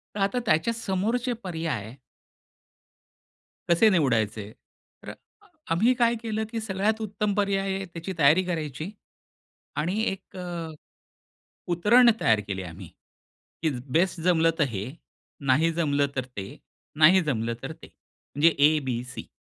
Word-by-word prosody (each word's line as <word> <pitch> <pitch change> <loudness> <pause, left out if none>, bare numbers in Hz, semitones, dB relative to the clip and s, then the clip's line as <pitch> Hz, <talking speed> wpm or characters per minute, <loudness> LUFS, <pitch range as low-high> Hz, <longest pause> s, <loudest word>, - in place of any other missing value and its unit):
तर - - -3
आता, 200 +6 +1
त्याच्या 160 +8 +2
समोरचे 230 +4 -1
पर्याय 160 - -4 1.7
कसे 170 +6 +5
निवडायचे? 110 - +1 0.5
तर - - -8
अ, - - -7 0.6
आम्ही 225 +10 +3
काय 235 -1 +2
केलं, 220 -1 -2
की 225 -1 -3
सगळ्यात 215 +1 -1
उत्तम 210 -1 -2
पर्याय 200 -1 +1 0.2
आहे 195 - -4
त्याची 175 +1 -7
तयारी 155 +6 +5
करायची 160 -1 -4 0.9
आणि 180 +8 -1
एक 195 0 -11
अ, 175 -3 -5 1.0
उतरण 235 +8 +5
तयार 110 -2 +3
केले 95 -2 -4
आम्ही, 90 0 -9 0.7
की 160 - +2 0.2
बेस्ट 175 +2 +2
जमलं 165 -2 +3
तर - - +5
हे, 105 +1 -4 0.6
नाही 155 +6 +3
जमलं 145 -4 +1
तर 130 - -2
ते, 100 -6 -8 0.4
नाही 180 +5 +7
जमलं 115 -6 -1
तर - - -4
ते, - - -12
म्हणजे 150 +4 -1
ए, 150 +2 +5
बी, 120 -2 -2
सी. 125 - -9
170 Hz, 135 wpm, -26 LUFS, 140-200 Hz, 1.7 s, नाही